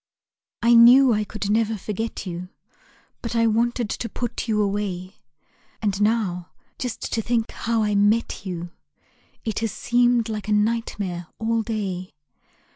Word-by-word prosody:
I 235 +1 +5
knew 245 +2 +8
I 210 0 +1
could 205 -1 -4
never 220 0 +1
forget 210 +2 -4
you; 180 0 -6 0.7
But 235 0 -4
I 230 0 +3
wanted 235 +1 +1
to 230 - -3
put 240 0 -4
you 215 -2 +1
away. 200 -2 -2 0.6
And 205 -2 -1
now, 205 -5 0 0.3
just 245 -3 -4
to 225 - +1
think 230 0 0
how 225 -1 0
I 210 -1 +1
met 205 +3 +2
you 175 -3 -5 0.7
It 220 - -1
has 225 -2 -1
seemed 240 0 +2
like 215 -2 -4
a 210 - +1
nightmare 210 -5 -1
all 225 +1 0
day. 195 -5 -4
220 Hz, 145 wpm, -23 LUFS, 200-230 Hz, 0.7 s, knew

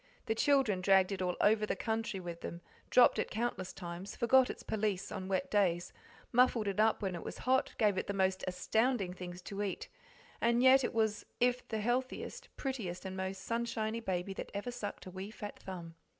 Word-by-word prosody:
The 220 - +1
children 230 -6 +3
dragged 190 0 +5
it 190 -2 -3
all 180 -1 0
over 215 +1 +4
the 210 - 0
country 225 -2 -2
with 170 -2 -7
them, 170 - -6 0.3
dropped 250 - +6
it - - -1
countless 220 -5 -2
times, 175 +2 -7
forgot 255 +2 +5
its - - -6
pelisse 205 -3 -1
on 190 -2 -4
wet 190 -1 -1
days, 175 -4 +2 0.4
muffled 240 -3 +4
it 200 0 -1
up 220 0 +3
when 190 -2 -1
it 170 - -5
was - - -6
hot, 260 +1 +1
gave 205 -3 +3
it - - -4
the 200 - -1
most 190 -1 +1
astounding 205 +2 +1
things 180 0 -8
to 200 -1 -5
eat, 200 -3 -3 0.5
and 235 +1 +3
yet 260 +1 +7
it - - -2
was 220 -2 +1
the 245 -2 +1
healthiest, 255 - -2
prettiest, 210 -10 -4
and 190 0 -4
most 190 0 -4
sunshiny 230 -1 -1
baby 190 -3 -2
that - - -6
ever 205 +5 -3
sucked 220 -4 -6
a 185 - -8
wee 190 +2 -6
fat 215 -2 -8
thumb. 175 -3 -7
205 Hz, 195 wpm, -33 LUFS, 185-235 Hz, 0.5 s, yet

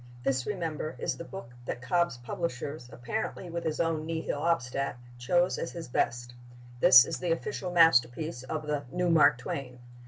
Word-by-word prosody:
This, 130 -1 0
remember, 165 -5 -3
is - - -2
the - - -7
book 170 -9 -9
that 120 - -5
Cobb's 170 -1 +1
publishers, 125 0 -5
apparently 175 - -4
with 170 0 -3
his 160 -2 -2
own 165 -2 0
Nihil 160 -3 -2
Obstat, 140 -5 0 0.2
choose 175 +9 +2
as - - -4
his 170 -1 -7
best. 120 0 -1 0.5
This 130 -5 +9
is 165 - -4
the 175 -2 -1
official 185 +2 -2
masterpiece 155 -4 +3
of 155 +4 -4
the 150 -1 -2
"new 180 -1 +1
Mark 150 -4 +6
Twain." 125 0 -5
155 Hz, 165 wpm, -29 LUFS, 125-170 Hz, 0.5 s, This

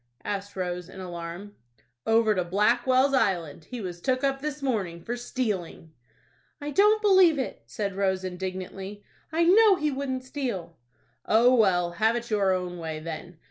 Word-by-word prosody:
asked 200 0 -4
Rose, 180 -1 -4
in 190 - -11
alarm. 175 +2 -7 0.5
"Over 225 -1 +4
to 185 -3 0
Blackwell's 240 +8 +2
Island. 170 - 0
He 250 - -7
was 175 -3 -6
took 255 +4 0
up 270 -1 0
this 295 -1 -4
morning 195 -10 -1
for 240 - -3
stealing." 210 - -4 0.7
"I 295 0 -5
don't 420 +5 +4
believe 375 -6 +6
it," 260 - -4
said 200 - -3
Rose, 190 -1 0
indignantly. 190 +2 -6 0.3
"I 330 +2 +2
know 400 +4 +6
he 300 -3 -1
wouldn't 265 -1 -3
steal." 240 - -4 0.5
"Oh, 240 +3 +5
well, 180 -7 +3
have 220 +6 +2
it 235 -1 -5
your 200 -3 +2
own 180 -1 -2
way, 160 -2 -4
then. 165 +2 -7
205 Hz, 160 wpm, -27 LUFS, 180-260 Hz, 0.7 s, believe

